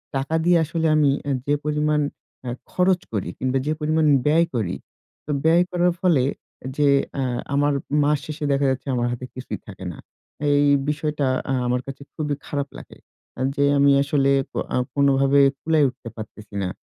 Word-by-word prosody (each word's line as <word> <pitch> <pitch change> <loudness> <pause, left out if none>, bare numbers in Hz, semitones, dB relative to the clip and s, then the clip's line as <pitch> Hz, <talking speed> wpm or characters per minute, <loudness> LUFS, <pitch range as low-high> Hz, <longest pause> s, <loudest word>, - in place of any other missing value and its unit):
টাকা 135 +4 -1
দিয়ে 175 0 +5
আসলে 160 +1 -1
আমি 150 -2 +4
এ্যা 140 - -2 0.2
যে 145 - +3
পরিমাণ 150 0 +1 0.4
এ্যা 125 - -4 0.2
খরচ 180 0 +2
করি, 100 -5 -2
কিংবা 130 +1 0
যে - - +1
পরিমাণ 155 +1 +1 0.2
ব্যয় 160 +3 +4
করি 95 -6 -1 0.5
তো 150 - -4
ব্যয় 165 +2 +5
করার 175 0 +2
ফলে 165 -9 +3 0.5
যে 145 -1 +3 0.3
এ্যা 135 - -1 0.3
আমার 145 +1 +2 0.3
মাস 150 0 +3
শেষে 155 0 -5
দেখা 140 0 +1
যাচ্ছে 130 +2 -4
আমার 120 0 0
হাতে 120 +1 -5
কিছুই 130 0 -6
থাকে 95 -2 -9
না। - - -11 0.5
এই 145 0 +4 0.2
বিষয়টা 150 -2 -1 0.2
এ্যা 135 - 0
আমার 125 0 0
কাছে 135 +1 -8
খুবই 150 -2 -2
খারাপ 140 -1 -2
লাগে। - - -12 0.6
যে 140 - +1
আমি 140 0 +5
আসলে 140 -1 +1
এ্যা 130 - -4 0.2
কোনভাবে 140 0 +3 0.2
কুলায় 155 -2 +3
উঠতে 125 -2 -10
পারতেছি 105 -1 -10
না। 90 - -1
145 Hz, 170 wpm, -23 LUFS, 135-155 Hz, 0.6 s, দিয়ে